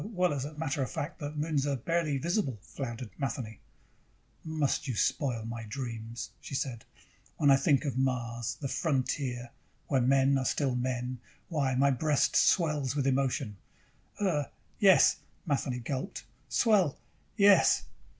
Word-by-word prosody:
"Uh, -, -, -6 dB
well, 180 Hz, -6 st, +1 dB
as 135 Hz, -2 st, -2 dB
a 150 Hz, +1 st, -8 dB
matter 150 Hz, -2 st, -2 dB
of 130 Hz, -, -1 dB
fact, 150 Hz, +5 st, -5 dB
the 145 Hz, -2 st, -4 dB
moons 150 Hz, -2 st, -1 dB
are 140 Hz, -, +1 dB
barely 155 Hz, +2 st, 0 dB
visible," 165 Hz, -, -1 dB
floundered 120 Hz, -4 st, -6 dB
Matheny. 120 Hz, -5 st, -4 dB, 0.8 s
"Must 155 Hz, -4 st, -1 dB
you 125 Hz, -, -2 dB
spoil 115 Hz, +3 st, 0 dB
my 115 Hz, 0 st, -5 dB
dreams?" 115 Hz, -1 st, -6 dB
she 135 Hz, -, -6 dB
said. 130 Hz, -5 st, -3 dB, 0.5 s
"When 145 Hz, -2 st, +4 dB
I -, -, +8 dB
think 140 Hz, 0 st, +2 dB
of 130 Hz, -3 st, -1 dB
Mars, 120 Hz, -3 st, -1 dB
the 140 Hz, -, -3 dB
frontier, 130 Hz, -5 st, -1 dB, 0.4 s
where 135 Hz, -3 st, +3 dB
men 135 Hz, +2 st, +4 dB
are 130 Hz, -, -2 dB
still 135 Hz, -2 st, +1 dB
men, 125 Hz, 0 st, -2 dB, 0.3 s
why, 140 Hz, -6 st, 0 dB
my 140 Hz, +2 st, +4 dB
breast 145 Hz, +2 st, +1 dB
swells 150 Hz, -6 st, +3 dB
with 140 Hz, -2 st, 0 dB
emotion." 130 Hz, -5 st, 0 dB, 0.6 s
"Uh, 170 Hz, -8 st, +1 dB, 0.3 s
yes." 195 Hz, -3 st, +6 dB, 0.3 s
Matheny 135 Hz, -5 st, -1 dB
gulped. 130 Hz, -1 st, -4 dB, 0.2 s
"Swell. 195 Hz, -, +3 dB, 0.4 s
Yes." 200 Hz, -1 st, +6 dB
135 Hz, 150 wpm, -30 LUFS, 125-150 Hz, 0.8 s, I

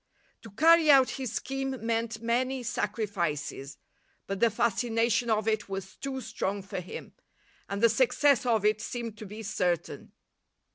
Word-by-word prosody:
To 225 Hz, -, -11 dB
carry 320 Hz, -, +5 dB
out 270 Hz, -3 st, +7 dB
his 260 Hz, -4 st, -4 dB
scheme 270 Hz, 0 st, -3 dB
meant 230 Hz, -1 st, -1 dB
many 255 Hz, +2 st, 0 dB
sacrifices, 175 Hz, -, -3 dB, 0.5 s
but 195 Hz, 0 st, -4 dB
the 235 Hz, -, +4 dB
fascination 230 Hz, +1 st, +1 dB
of 215 Hz, -1 st, +1 dB
it 215 Hz, -2 st, 0 dB
was 195 Hz, 0 st, -6 dB
too 270 Hz, -1 st, -4 dB
strong 200 Hz, -3 st, -3 dB
for 195 Hz, 0 st, -5 dB
him, 180 Hz, -, -8 dB, 0.6 s
and 200 Hz, +2 st, -3 dB
the -, -, +9 dB
success 265 Hz, +3 st, +3 dB
of 225 Hz, -4 st, +1 dB
it 215 Hz, 0 st, +2 dB
seemed 230 Hz, -2 st, -5 dB
to 215 Hz, -, -8 dB
be 215 Hz, +3 st, -8 dB
certain. 180 Hz, -5 st, -2 dB
225 Hz, 150 wpm, -29 LUFS, 200-245 Hz, 0.6 s, the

